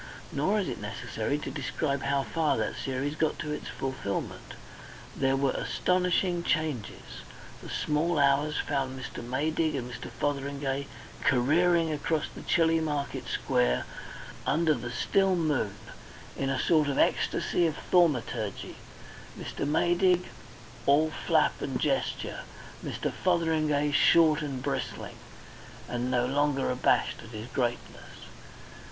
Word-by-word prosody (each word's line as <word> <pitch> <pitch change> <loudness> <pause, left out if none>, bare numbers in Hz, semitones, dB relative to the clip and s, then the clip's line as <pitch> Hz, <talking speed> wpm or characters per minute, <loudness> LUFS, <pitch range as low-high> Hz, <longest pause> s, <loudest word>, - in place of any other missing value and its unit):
Nor 190 +10 +1
is 190 - -3
it 125 - -4
necessary 110 +4 -3
to 150 - -5
describe 140 0 -2
how 140 0 +1
far 160 +1 0
that - - -1
series 135 +2 -2
got 155 0 0
to 150 - -4
its 150 - -4
fulfilment. 130 -7 -4 0.6
There 135 0 +2
were 135 -1 +2
astonishing 180 -1 +1
changes. 155 -10 -2 0.4
The - - -9
small 155 +3 0
hours 145 +1 +3
found 135 -2 -1
Mr. 120 -1 -7
Maydig 155 +5 0
and 125 -3 -3
Mr. 120 - -7
Fotheringay 140 +1 -2 0.4
careering 160 +6 +3
across 150 +1 0
the - - -9
chilly 165 -2 +3
market 145 -3 -2
square 60 0 +1 0.6
under 160 +1 +3
the 120 -3 -4
still 190 +10 +2
moon, 150 - 0 0.6
in 135 - -1
a 135 -1 0
sort 155 0 +3
of 140 - -1
ecstasy 175 - +2
of 155 - -3
thaumaturgy, 125 - +1 0.6
Mr. - - -4
Maydig 175 +4 +3 0.6
all 155 +3 +4 0.2
flap - - +3
and - - -2
gesture, - - -1 0.4
Mr. - - -3
Fotheringay 155 -4 +1
short 155 +2 +5
and 135 -4 -4
bristling, 135 -2 -3 0.7
and 120 +1 -2
no 125 -1 +2
longer 140 0 +1
abashed 125 0 +2
at 110 - -11
his 110 -1 -7
greatness. 120 -2 -4
145 Hz, 130 wpm, -29 LUFS, 130-160 Hz, 0.7 s, short